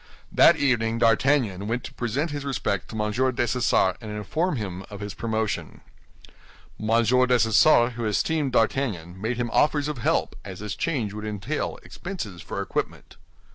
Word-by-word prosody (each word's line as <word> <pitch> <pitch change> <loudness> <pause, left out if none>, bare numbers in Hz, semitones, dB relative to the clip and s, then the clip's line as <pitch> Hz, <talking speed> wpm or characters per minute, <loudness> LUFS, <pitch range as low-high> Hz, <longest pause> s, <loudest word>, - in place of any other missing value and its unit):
That - - +6
evening 115 -5 +1
D'Artagnan 115 -3 +2
went 120 +2 -2
to - - -8
present 135 +7 -2
his 145 -1 -4
respects 105 -9 -2
to 110 - -6
M. 105 0 0
Dessessart, 120 -5 +1
and 110 - -7
inform 145 - -1
him 95 -5 -5
of 100 -2 -8
his 105 -1 -5
promotion. 110 -2 -3 1.0
M. 115 +2 +2
Dessessart, 125 0 +4
who 120 -1 -4
esteemed 140 +6 0
D'Artagnan, 105 -8 0
made 115 +3 -1
him 120 -1 -2
offers 145 -1 +2
of 150 -4 -4
help, - - 0
as 95 -2 -8
this 105 0 -5
change 125 -11 -2
would 105 0 -6
entail 105 +8 -3
expenses 130 - -7
for - - -4
equipment. - - -4
115 Hz, 155 wpm, -25 LUFS, 105-130 Hz, 1.0 s, That